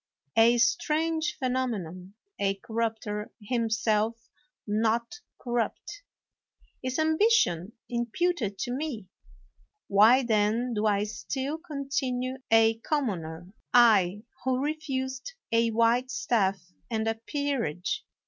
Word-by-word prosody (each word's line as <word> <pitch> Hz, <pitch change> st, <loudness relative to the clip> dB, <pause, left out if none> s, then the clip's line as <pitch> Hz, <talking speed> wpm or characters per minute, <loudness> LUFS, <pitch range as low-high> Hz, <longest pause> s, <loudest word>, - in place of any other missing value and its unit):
A 230 Hz, +2 st, +6 dB
strange 315 Hz, +6 st, +1 dB
phenomenon, 210 Hz, -, -3 dB, 0.2 s
a 195 Hz, 0 st, +1 dB
corrupter 220 Hz, -1 st, -3 dB
himself 225 Hz, 0 st, 0 dB, 0.4 s
not 225 Hz, -, 0 dB, 0.2 s
corrupt! 240 Hz, -, -3 dB, 0.8 s
Is 255 Hz, 0 st, -2 dB
ambition 315 Hz, -, +2 dB
imputed 240 Hz, -, -1 dB
to 245 Hz, -, -3 dB
me? 250 Hz, -8 st, -4 dB, 0.8 s
Why 220 Hz, +6 st, +6 dB
then 225 Hz, +2 st, +1 dB
do 215 Hz, 0 st, +1 dB
I 205 Hz, -1 st, +2 dB
still 265 Hz, +8 st, -4 dB
continue 270 Hz, -5 st, -3 dB
a 225 Hz, 0 st, +4 dB
commoner? 185 Hz, -, -3 dB, 0.2 s
— -, -, -45 dB
I, 210 Hz, -5 st, +5 dB, 0.2 s
who 260 Hz, 0 st, +1 dB
refused 270 Hz, -, -3 dB, 0.2 s
a 230 Hz, 0 st, +3 dB
white 230 Hz, +3 st, +2 dB
staff 195 Hz, -8 st, 0 dB, 0.2 s
and 220 Hz, -1 st, -1 dB
a 225 Hz, -, +2 dB
peerage. 255 Hz, -, -2 dB
230 Hz, 100 wpm, -28 LUFS, 210-265 Hz, 0.8 s, A